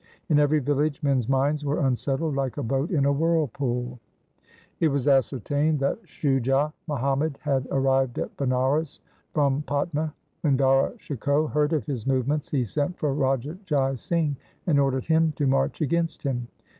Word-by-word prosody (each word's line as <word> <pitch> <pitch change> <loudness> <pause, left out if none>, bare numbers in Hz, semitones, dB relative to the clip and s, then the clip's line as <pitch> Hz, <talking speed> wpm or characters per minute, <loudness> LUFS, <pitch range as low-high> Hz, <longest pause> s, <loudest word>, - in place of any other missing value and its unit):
In 150 -2 +4
every 150 +1 +3
village 145 +1 0
men's 135 -4 +1
minds 140 +3 +1
were 145 +1 0
unsettled 135 +4 0
like 135 -2 -2
a - - -2
boat 135 +6 -1
in 145 -6 +1
a 140 - +4
whirlpool. 135 -5 0 0.8
It 165 - +4
was 140 -2 -1
ascertained 145 +3 +2
that 140 - 0
Shujah 135 +1 +1
Muhammad 140 +1 0
had 135 -3 0
arrived 135 -2 +1
at - - -4
Banaras 135 +3 0 0.3
from 140 -2 +1
Patna. 150 +2 -1 0.3
When 140 -4 +2
Dara 135 0 +3
Shikoh 145 - 0
heard 150 0 +1
of 155 -4 0
his 135 -5 -4
movements, 135 +3 0
he 130 -4 0
sent 145 - -2
for 150 -4 0
Raja 135 +4 -1
Jai 140 -7 +1
Singh 150 +3 -1 0.3
and 150 -5 +3
ordered 135 -2 +1
him 160 -1 +3
to 145 - -1
march 135 +3 +1
against 165 +3 0
him. 125 -4 -2
140 Hz, 160 wpm, -25 LUFS, 135-150 Hz, 0.8 s, In